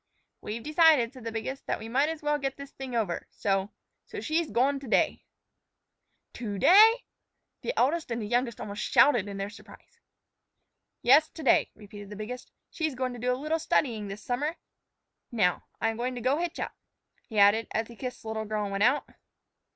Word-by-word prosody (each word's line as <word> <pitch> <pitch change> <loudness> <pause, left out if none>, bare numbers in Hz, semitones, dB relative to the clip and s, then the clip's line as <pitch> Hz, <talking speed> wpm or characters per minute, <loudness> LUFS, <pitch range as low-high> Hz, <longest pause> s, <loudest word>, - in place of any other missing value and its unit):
"We've 225 +2 -5
decided," 305 -6 +4
said 255 -4 -12
the 230 - -3
biggest, 225 +5 -5
"that - - 0
we 220 - -8
might 270 +6 +2
as 320 -1 -6
well 295 0 +1
get 270 -1 -3
this 280 0 -9
thing 265 -2 -7
over. 205 -7 -1
So 195 -1 -1 0.4
so - - -6
she's 320 0 -1
goin' 275 +4 +2
to 270 - -10
day." - - +1 1.1
"To 210 -4 -5
day?" 435 - +7 0.6
The - - -2
eldest 310 +4 +1
and 235 0 -2
the 215 - -4
youngest 240 +1 0
almost 205 0 -5
shouted 240 -9 +4
in 200 -1 -6
their 195 +1 -4
surprise. 210 - -16 1.0
"Yes, 290 +6 +6
to 320 - -10
day," 265 - +4
repeated 205 -1 -11
the 210 - -8
biggest. 230 +4 -7 0.2
"She's 315 -4 -2
goin' 255 0 -2
to 245 - -8
do 250 +2 0
a 250 - 0
little 305 +4 -1
studyin' 225 -9 0
this 200 +1 -8
summer; 290 +7 -1 0.8
now, 195 -7 +1
I'm 225 -1 0
goin' 250 +2 -2
to 255 +4 +1
hitch 345 0 -3
up," - - -3 0.6
he 220 - -6
added, 205 +3 +5
as 225 0 -2
he 235 - -12
kissed 250 +1 -6
the 220 - -6
little 220 0 -3
girl 215 0 -2
and 200 - -4
went 195 +1 0
out. 260 +6 +3
245 Hz, 195 wpm, -28 LUFS, 215-285 Hz, 1.1 s, day